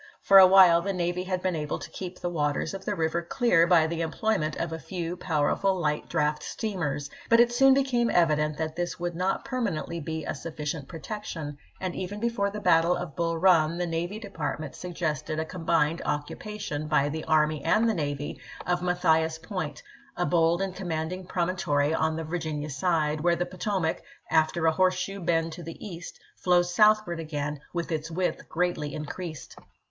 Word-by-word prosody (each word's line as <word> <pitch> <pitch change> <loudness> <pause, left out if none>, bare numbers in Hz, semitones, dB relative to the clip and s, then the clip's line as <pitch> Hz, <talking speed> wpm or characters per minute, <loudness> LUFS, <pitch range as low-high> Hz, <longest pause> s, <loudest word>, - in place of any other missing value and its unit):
For 195 0 +8
a 190 - +10
while 185 -3 +7
the 195 +2 -2
navy 180 0 -1
had 185 -1 -2
been 185 -2 0
able 150 -2 -2
to - - -9
keep 180 -1 -7
the 175 - -2
waters 150 -1 -1
of 195 0 -7
the 205 - -1
river 165 0 0
clear 170 -2 +3
by 170 -3 +5
the 165 +1 -2
employment 165 -1 0
of 165 -1 -3
a 160 - -4
few 175 +2 -4
powerful 180 +3 +1
light 150 -3 -1
draft 150 -2 0
steamers; 155 -10 -3 0.2
but 230 - +6
it 240 0 +5
soon 270 +2 +6
be 275 - +3
came 240 -3 +1
evident 150 -3 +2
that 160 0 -3
this 175 +1 -3
would 175 0 -2
not 185 +2 -1
permanently 185 -10 -2
be 160 0 -4
a - - -2
sufficient 150 -1 -5
protection, 165 -5 -6 0.2
and 185 -2 -3
even 190 +3 -4
before 230 -3 0
the 210 +1 -6
battle 170 -3 +4
of 175 -5 -6
Bull 165 -1 0
Run 165 -2 +4
the 175 - -1
Navy 170 +4 -3
Department 160 -8 -5
suggested 160 -3 -3
a 160 - -1
combined 165 -1 0
occupation, 150 +1 -4
by 150 -2 +3
the 155 +2 -4
army 155 -2 +2
and 225 +2 +3
the 225 - +2
navy, 145 -4 -3 0.2
of 175 0 0
Mathias 160 -3 +2
Point, 165 -3 -5 0.3
a 175 - +1
bold 170 +1 +2
and 190 -1 -4
commanding 175 0 -4
promon 180 0 -1
tory 145 -2 +1
on 160 0 +1
the 165 - -3
Virginia 155 -2 -3
side, 150 0 0
where 175 +1 +3
the 175 - -1
Potomac, 185 -1 -2 0.3
after 160 +1 +2
a 160 - +5
horseshoe 185 +3 0
bend 165 -2 0
to 175 - -8
the 165 -1 -8
east, 170 -4 -8 0.2
flows 175 -1 +2
southward 210 -4 +4
again 150 -2 -3
with 170 0 -3
its 160 0 -2
width 175 0 -2
greatly 165 -3 -1
increased. 155 +1 -6
170 Hz, 185 wpm, -27 LUFS, 155-185 Hz, 0.3 s, a